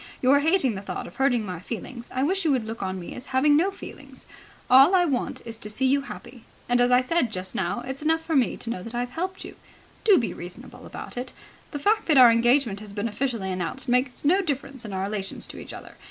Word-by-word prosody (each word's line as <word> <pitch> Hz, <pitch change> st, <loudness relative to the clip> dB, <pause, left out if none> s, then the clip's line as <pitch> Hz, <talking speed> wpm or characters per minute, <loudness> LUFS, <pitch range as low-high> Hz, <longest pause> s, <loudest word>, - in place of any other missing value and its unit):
You 255 Hz, -, +3 dB
are 285 Hz, -, +6 dB
hating 300 Hz, -5 st, +2 dB
the 190 Hz, -, -5 dB
thought 200 Hz, -, -5 dB
of -, -, -12 dB
hurting 255 Hz, -5 st, +2 dB
my 180 Hz, -3 st, -5 dB
feelings. 235 Hz, +4 st, -7 dB
I 260 Hz, -, -1 dB
wish 380 Hz, +6 st, 0 dB
you 315 Hz, -, +2 dB
would 255 Hz, -4 st, 0 dB
look 225 Hz, 0 st, -6 dB
on 190 Hz, -1 st, -3 dB
me 175 Hz, -, -8 dB
as 250 Hz, +2 st, -8 dB
having 270 Hz, +3 st, +3 dB
no 345 Hz, +6 st, +3 dB
feelings. 390 Hz, -, -11 dB, 0.4 s
All 270 Hz, +8 st, +7 dB
I 355 Hz, -1 st, +4 dB
want 270 Hz, -7 st, -2 dB
is 225 Hz, -1 st, -5 dB
to 210 Hz, -, -6 dB
see 245 Hz, +5 st, -1 dB
you 275 Hz, +2 st, +3 dB
happy. 255 Hz, -3 st, -10 dB, 0.2 s
As 245 Hz, 0 st, +3 dB
I 250 Hz, 0 st, +6 dB
said 255 Hz, -2 st, 0 dB
just 185 Hz, -2 st, -4 dB
now, 190 Hz, +6 st, -2 dB
it's 265 Hz, +3 st, -6 dB
enough 320 Hz, +1 st, +1 dB
for 325 Hz, -, -1 dB
me 260 Hz, -4 st, +2 dB
to 230 Hz, -, -5 dB
know 185 Hz, -, -4 dB
that 230 Hz, +5 st, -8 dB
I've 245 Hz, +1 st, -2 dB
helped 370 Hz, +7 st, -4 dB
you. -, -, -11 dB, 0.5 s
Do 410 Hz, -4 st, +6 dB
be 225 Hz, -8 st, -1 dB
reasonable 175 Hz, +1 st, -10 dB
about -, -, -8 dB
it. 250 Hz, +1 st, -5 dB, 0.4 s
The 290 Hz, -, -5 dB
fact 425 Hz, +9 st, +1 dB
that 305 Hz, -4 st, +4 dB
our 250 Hz, -2 st, +9 dB
engagement 235 Hz, -2 st, +3 dB
has 210 Hz, -1 st, -10 dB
been 205 Hz, +2 st, -2 dB
officially 225 Hz, -3 st, -2 dB
announced 185 Hz, +10 st, -3 dB
makes 250 Hz, +2 st, 0 dB
no 365 Hz, +7 st, +4 dB
difference 275 Hz, -6 st, -4 dB
in 210 Hz, -, -6 dB
our 190 Hz, 0 st, -2 dB
relations 195 Hz, -1 st, -4 dB
to -, -, -9 dB
each -, -, -9 dB
other. -, -, -10 dB
250 Hz, 245 wpm, -25 LUFS, 215-285 Hz, 0.5 s, our